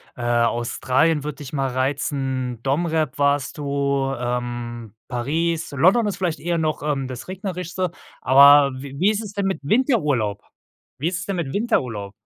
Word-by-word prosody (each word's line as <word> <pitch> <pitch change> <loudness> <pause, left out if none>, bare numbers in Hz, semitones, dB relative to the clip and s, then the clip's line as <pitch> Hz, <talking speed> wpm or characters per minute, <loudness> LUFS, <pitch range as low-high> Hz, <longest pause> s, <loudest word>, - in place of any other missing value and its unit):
äh, - - -8
Australien 120 +5 +1
würd 150 -1 -5
dich 145 -2 -9
mal 135 -2 0
reizen, 130 -2 -2
Dom. 140 +6 +1
Rep. 160 -1 -1
warst 140 -1 +1
du, 140 -1 0
ähm, 120 -2 -4
Paris, 160 +7 -1
London 185 - +4
ist 200 - -3
vielleicht 175 -4 -1
eher 170 0 -1
noch, 155 -2 -1
ähm, 140 -3 -1
das 130 -2 -8
Regnerischste, 185 -1 -4 0.3
aber 140 +1 +7
w 140 -1 -8
wie 195 +5 +4
ist 215 +1 -2
es 205 -2 -8
denn 200 -1 -1
mit 190 -4 -1
Winterurlaub? 145 - +1 0.6
Wie 150 - -1
ist 175 -1 -1
es 185 - -6
denn 200 -2 -2
mit 165 -7 -3
Winterurlaub? 125 - -1
140 Hz, 165 wpm, -22 LUFS, 130-170 Hz, 0.6 s, aber